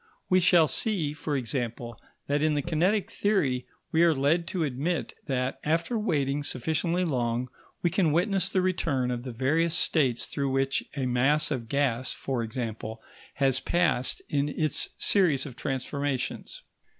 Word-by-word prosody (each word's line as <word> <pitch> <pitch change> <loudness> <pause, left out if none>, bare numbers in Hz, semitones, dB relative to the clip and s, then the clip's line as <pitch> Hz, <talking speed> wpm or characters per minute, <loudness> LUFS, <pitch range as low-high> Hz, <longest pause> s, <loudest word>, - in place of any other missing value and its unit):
We 185 - +6
shall 175 -2 +5
see, 160 - +1
for 150 -2 -2
example, 120 -2 -3 0.3
that 145 +1 0
in 155 -1 +2
the 145 - 0
kinetic 180 +5 +1
theory 145 -12 0 0.2
we 160 - +3
are 170 -2 +5
led 155 +6 +1
to 185 -2 -1
admit 140 0 -2
that, 130 -1 -1
after 165 +10 0
waiting 145 -10 0
sufficiently 160 +6 -1
long, 125 -4 -1 0.3
we 175 - +2
can 170 -4 +2
witness 190 +3 +2
the 185 -1 +1
return 145 -9 0
of 120 -1 -3
the 130 0 -6
various 155 +8 +1
states 130 -10 +2
through 140 -1 -2
which 135 0 0
a 135 - 0
mass 135 +5 +2
of 120 -5 -3
gas, 130 -3 +1
for 130 -3 -3
example, 110 -1 -5 0.4
has 135 -2 +2
passed 165 -6 0
in 145 0 0
its 155 0 0
series 165 -9 +3
of 130 -5 -8
transformations. 135 0 -3
145 Hz, 155 wpm, -27 LUFS, 130-170 Hz, 0.4 s, We